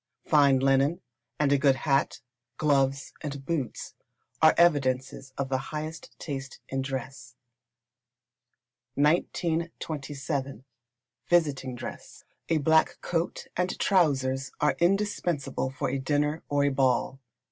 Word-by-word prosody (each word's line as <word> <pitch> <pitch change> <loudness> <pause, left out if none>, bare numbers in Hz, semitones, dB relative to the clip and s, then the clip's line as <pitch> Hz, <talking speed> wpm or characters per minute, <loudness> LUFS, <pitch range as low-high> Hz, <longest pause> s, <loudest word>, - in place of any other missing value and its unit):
Fine 140 -4 +4
linen, 135 +4 +3 0.4
and 145 -2 +2
a 140 - +4
good 140 -1 +4
hat, 135 0 0 0.4
gloves, 140 -2 +1
and 140 -2 -6
boots, 140 -7 -3 0.5
are 160 0 +6
evidences 135 -5 +2
of 140 -1 -2
the 130 -1 0
highest 155 +1 -6
taste 135 -3 -6
in 135 0 -1
dress. 135 0 -6 1.6
1927. 145 -4 -1 0.6
Visiting 140 -7 +1
Dress. 120 - -9 0.3
A 165 - +3
black 160 +2 +3
coat 170 0 -2
and 180 +1 -1
trousers 135 -8 +1
are 150 - +2
indispensable 175 -8 0
for 130 - -3
a 135 - -1
dinner, 150 +3 0
or 145 0 +2
a 145 - +3
ball. 130 -1 +1
140 Hz, 115 wpm, -27 LUFS, 135-160 Hz, 1.6 s, are